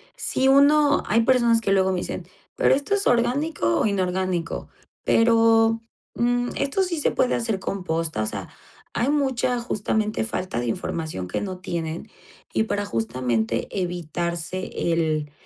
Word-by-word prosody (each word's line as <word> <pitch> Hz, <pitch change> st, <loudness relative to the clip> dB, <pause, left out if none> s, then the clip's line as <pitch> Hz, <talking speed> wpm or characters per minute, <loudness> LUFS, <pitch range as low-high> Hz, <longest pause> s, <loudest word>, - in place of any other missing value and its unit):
si 265 Hz, -, 0 dB
uno 285 Hz, +1 st, +5 dB
Hay 230 Hz, +2 st, +3 dB
personas 235 Hz, -2 st, +4 dB
que 195 Hz, -, 0 dB
luego 190 Hz, -1 st, +3 dB
me 185 Hz, -, -1 dB
dicen: -, -, -5 dB, 0.3 s
"¿Pero -, -, +4 dB
esto 285 Hz, +9 st, +1 dB
es 400 Hz, -, -1 dB
orgánico 245 Hz, -, +1 dB
o -, -, +2 dB
inorgánico? 185 Hz, -3 st, -1 dB, 0.4 s
Pero, 225 Hz, 0 st, +4 dB, 0.4 s
mm, 245 Hz, +1 st, +1 dB
¿esto 280 Hz, +7 st, 0 dB
sí 340 Hz, -4 st, -2 dB
se -, -, +1 dB
puede 255 Hz, -, +1 dB
hacer 225 Hz, -4 st, -1 dB
composta?", 165 Hz, -, -2 dB
o -, -, -1 dB
sea, -, -, -5 dB, 0.4 s
hay 240 Hz, +4 st, 0 dB
mucha 260 Hz, -4 st, +1 dB
justamente 215 Hz, -1 st, -1 dB
falta 185 Hz, -, -3 dB
de 120 Hz, -, -2 dB
información 155 Hz, -, -3 dB
que 90 Hz, -, -3 dB
no 185 Hz, -3 st, -5 dB
tienen 170 Hz, +1 st, -4 dB, 0.4 s
y -, -, +2 dB
para 205 Hz, -2 st, -2 dB
justamente 115 Hz, -, -1 dB
evitarse 175 Hz, 0 st, -3 dB, 0.2 s
el 155 Hz, -3 st, 0 dB
205 Hz, 150 wpm, -24 LUFS, 165-245 Hz, 0.4 s, uno